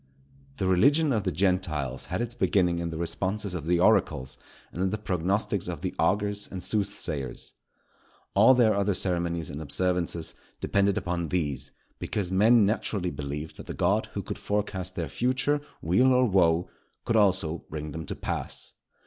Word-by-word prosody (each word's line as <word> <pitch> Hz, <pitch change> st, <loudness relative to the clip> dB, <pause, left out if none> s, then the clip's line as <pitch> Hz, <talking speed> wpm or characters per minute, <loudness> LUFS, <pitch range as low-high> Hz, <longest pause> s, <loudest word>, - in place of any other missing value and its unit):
The 95 Hz, -, -1 dB
religion 140 Hz, -, +4 dB
of 105 Hz, -3 st, -1 dB
the 95 Hz, -, +1 dB
Gentiles 80 Hz, -7 st, 0 dB
had -, -, -2 dB
its 120 Hz, 0 st, -5 dB
beginning 90 Hz, -5 st, +2 dB
in 85 Hz, 0 st, -2 dB
the 80 Hz, -, -5 dB
responses 95 Hz, +4 st, -2 dB
of 80 Hz, -4 st, -5 dB
the 85 Hz, 0 st, +3 dB
oracles 65 Hz, -5 st, +2 dB, 0.4 s
and 90 Hz, -, -5 dB
in 95 Hz, -, +2 dB
the 105 Hz, -, -2 dB
prognostics 95 Hz, 0 st, -1 dB
of 85 Hz, -4 st, -5 dB
the -, -, -3 dB
augurs 105 Hz, 0 st, +1 dB
and 95 Hz, -1 st, -6 dB
soothsayers. 85 Hz, -, -3 dB, 0.8 s
All 115 Hz, +6 st, +7 dB
their 115 Hz, -3 st, +4 dB
other 100 Hz, -1 st, +1 dB
ceremonies 85 Hz, -3 st, -1 dB
and 75 Hz, +2 st, -6 dB
observances 85 Hz, +2 st, -1 dB, 0.3 s
depended 100 Hz, 0 st, +1 dB
upon 85 Hz, -1 st, -2 dB
these; 75 Hz, -6 st, -2 dB, 0.3 s
because 95 Hz, -4 st, -2 dB
men 110 Hz, +3 st, +5 dB
naturally 100 Hz, -3 st, -1 dB
believed 75 Hz, +2 st, -5 dB
that -, -, -10 dB
the -, -, -5 dB
God -, -, +1 dB
who -, -, -3 dB
could -, -, -6 dB
forecast 95 Hz, -3 st, -2 dB
their 85 Hz, -3 st, -2 dB
future 130 Hz, -, 0 dB, 0.2 s
weal 95 Hz, +11 st, +4 dB
or 125 Hz, 0 st, +4 dB
woe, 90 Hz, -4 st, +3 dB, 0.4 s
could 115 Hz, -, +1 dB
also 95 Hz, -6 st, +2 dB
bring 75 Hz, 0 st, -5 dB
them 80 Hz, +2 st, -6 dB
to -, -, -4 dB
pass. -, -, -4 dB
90 Hz, 165 wpm, -27 LUFS, 85-105 Hz, 0.8 s, All